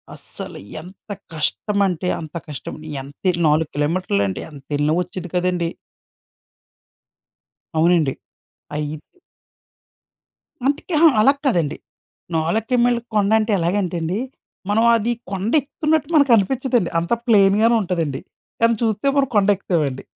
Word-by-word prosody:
అస్సలు -, -, -9 dB, 0.2 s
ఎంత 185 Hz, +5 st, -16 dB, 0.2 s
కష్టం 200 Hz, +6 st, -1 dB
అంటే 180 Hz, 0 st, -3 dB
అంత 160 Hz, 0 st, -9 dB
కష్టం. 150 Hz, -3 st, -7 dB, 0.3 s
ఎంతే 145 Hz, +7 st, -3 dB, 0.2 s
4 150 Hz, +1 st, +2 dB
కిలోమీటర్లండి. 145 Hz, -, 0 dB
ఎంత 140 Hz, -2 st, -13 dB
ఎళ్ళినా 150 Hz, +2 st, +1 dB
వచ్చేది 180 Hz, 0 st, -8 dB
కాదండి. 180 Hz, -1 st, 0 dB, 2.1 s
అవునండి. 165 Hz, -4 st, +3 dB, 0.6 s
అయ్యింది. 150 Hz, 0 st, -4 dB, 1.6 s
అందుకే, 285 Hz, +3 st, 0 dB
అహా! 330 Hz, 0 st, +7 dB
అలా 275 Hz, +6 st, +6 dB
కాదండి. 165 Hz, -, +1 dB, 0.6 s
4 170 Hz, +8 st, 0 dB
కీ 250 Hz, -, +3 dB
మైళ్ళ 245 Hz, -1 st, +2 dB, 0.2 s
కొండంటే 215 Hz, +2 st, +2 dB
ఎలాగంటేండి, 175 Hz, 0 st, -1 dB, 0.5 s
మనం 225 Hz, +3 st, +3 dB
అది 230 Hz, +2 st, 0 dB, 0.2 s
కొండ 195 Hz, +4 st, -2 dB
ఎక్కుతున్నట్టు 305 Hz, +2 st, -1 dB
మనకు 280 Hz, -3 st, +4 dB
అనిపించదండి. 245 Hz, -1 st, +1 dB
అంత 170 Hz, +6 st, -3 dB
ప్లెయిన్‌గానే 215 Hz, +1 st, +5 dB
ఉంటదండి. 165 Hz, -7 st, -2 dB, 0.4 s
కానీ 230 Hz, 0 st, +4 dB
చూస్తే 220 Hz, +2 st, 0 dB
మనం 275 Hz, -1 st, +3 dB
కొండ 205 Hz, -1 st, +3 dB
ఎక్కుతామండి. 155 Hz, -8 st, -2 dB
185 Hz, 115 wpm, -21 LUFS, 160-225 Hz, 2.1 s, అహా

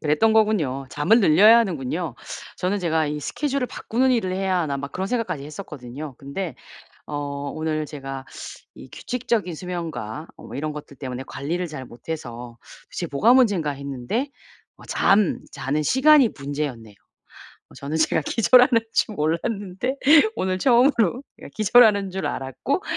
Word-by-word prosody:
그랬던 155 Hz, +9 st, +2 dB
거군요. 170 Hz, -12 st, +1 dB
잠을 200 Hz, +11 st, +3 dB
늘려야 210 Hz, +7 st, +7 dB
하는군요. 165 Hz, -, -2 dB, 0.4 s
저는 190 Hz, +3 st, -1 dB
제가 160 Hz, -3 st, 0 dB
'이 150 Hz, 0 st, -3 dB
스케줄을 275 Hz, -, -2 dB
바꾸는 255 Hz, +3 st, 0 dB
일을 190 Hz, -6 st, 0 dB
해야 190 Hz, -1 st, 0 dB
하나.' 150 Hz, -5 st, -1 dB
막 140 Hz, 0 st, -6 dB
그런 190 Hz, +1 st, -3 dB
생각까지 230 Hz, -, -2 dB
했었거든요. 145 Hz, -4 st, -8 dB
근데 150 Hz, +6 st, -5 dB, 0.5 s
어 150 Hz, -, -6 dB, 0.4 s
오늘 155 Hz, -1 st, -2 dB
제가 135 Hz, -2 st, -7 dB, 0.5 s
이 -, -, -13 dB
규칙적인 230 Hz, -7 st, -2 dB
수면과 160 Hz, -, -5 dB
뭐 -, -, -10 dB
이런 150 Hz, +2 st, -3 dB
것들 145 Hz, -2 st, -10 dB
때문에 130 Hz, -1 st, -5 dB
관리를 175 Hz, +5 st, -3 dB
잘 135 Hz, -4 st, -7 dB
못해서 120 Hz, -2 st, -8 dB, 0.3 s
도대체 170 Hz, -, -4 dB
뭐가 180 Hz, -, +4 dB
문젠가 205 Hz, -, +3 dB
했는데 140 Hz, -, -4 dB, 0.5 s
어 -, -, -15 dB
잠자는 155 Hz, -7 st, +1 dB
시간이 265 Hz, -, +5 dB
문제였네요. 140 Hz, -7 st, -5 dB, 0.7 s
어 -, -, -18 dB
저는 145 Hz, +3 st, -4 dB
제가 160 Hz, 0 st, +2 dB
기절하는 245 Hz, 0 st, +5 dB
줄 215 Hz, -, +1 dB
몰랐는데 195 Hz, -, -2 dB, 0.4 s
오늘 185 Hz, 0 st, -1 dB
처음으로 245 Hz, -, +3 dB, 0.2 s
예 -, -, -9 dB
기절하는 215 Hz, -2 st, +4 dB
줄 190 Hz, +1 st, -4 dB
알았고 135 Hz, -, -3 dB
165 Hz, 330 characters per minute, -23 LUFS, 140-220 Hz, 0.7 s, 늘려야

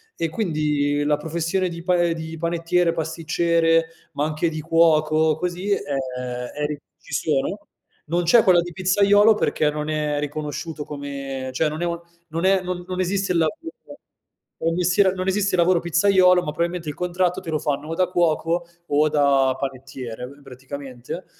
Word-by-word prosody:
e 165 Hz, -, -2 dB
quindi 150 Hz, -6 st, 0 dB
la 150 Hz, 0 st, +2 dB
professione 170 Hz, +4 st, -1 dB
di 170 Hz, -1 st, -8 dB
pa 180 Hz, 0 st, +2 dB
ehm, 170 Hz, -1 st, +2 dB
di 160 Hz, 0 st, -7 dB
panettiere, 170 Hz, +1 st, +1 dB
pasticcere, 165 Hz, 0 st, +1 dB, 0.3 s
ma 145 Hz, 0 st, -1 dB
anche 155 Hz, +2 st, -1 dB
di 155 Hz, -1 st, -5 dB
cuoco, 155 Hz, -1 st, +3 dB
così, 180 Hz, +3 st, -3 dB
ehm, 200 Hz, -, +2 dB, 0.8 s
eri 150 Hz, 0 st, -3 dB, 0.2 s
ci -, -, -17 dB
sono. 155 Hz, +7 st, 0 dB, 0.5 s
Non 170 Hz, +3 st, 0 dB
c'è 220 Hz, +7 st, +5 dB
quella 180 Hz, -3 st, +5 dB
di 175 Hz, +1 st, -6 dB
pizzaiolo 200 Hz, +4 st, +4 dB
perché 155 Hz, -6 st, +1 dB
non 150 Hz, 0 st, -4 dB
è 150 Hz, -1 st, -1 dB
riconosciuto 150 Hz, +1 st, -4 dB
come 140 Hz, -2 st, -5 dB
cioè 155 Hz, +4 st, +1 dB
non 155 Hz, +2 st, -5 dB
è -, -, 0 dB
un 170 Hz, 0 st, -2 dB, 0.3 s
non 165 Hz, +3 st, -2 dB
è 190 Hz, 0 st, +4 dB
non 180 Hz, -1 st, -4 dB
non 185 Hz, 0 st, -4 dB
esiste 190 Hz, +1 st, 0 dB
il -, -, +1 dB
lavoro, 165 Hz, -, 0 dB, 1.0 s
o -, -, 0 dB
il -, -, -1 dB
mestiere 180 Hz, +2 st, +3 dB
non 185 Hz, 0 st, -4 dB
esiste 200 Hz, +1 st, +1 dB
il 175 Hz, -, +3 dB
lavoro 175 Hz, 0 st, +4 dB
pizzaiolo, 180 Hz, +1 st, +4 dB
ma 150 Hz, -, -3 dB
probabilmente 170 Hz, 0 st, -2 dB
il 145 Hz, -, -5 dB
contratto 180 Hz, 0 st, 0 dB
te -, -, -8 dB
lo 155 Hz, -, 0 dB
fanno 145 Hz, -1 st, -2 dB
o -, -, -2 dB
da 185 Hz, +1 st, +2 dB
cuoco 170 Hz, 0 st, 0 dB, 0.2 s
o 150 Hz, +2 st, +3 dB
da 140 Hz, -3 st, +3 dB
panettiere 130 Hz, -3 st, -6 dB
b 140 Hz, +2 st, -15 dB
praticamente. 135 Hz, +3 st, -8 dB
165 Hz, 175 wpm, -22 LUFS, 150-180 Hz, 1.0 s, c'è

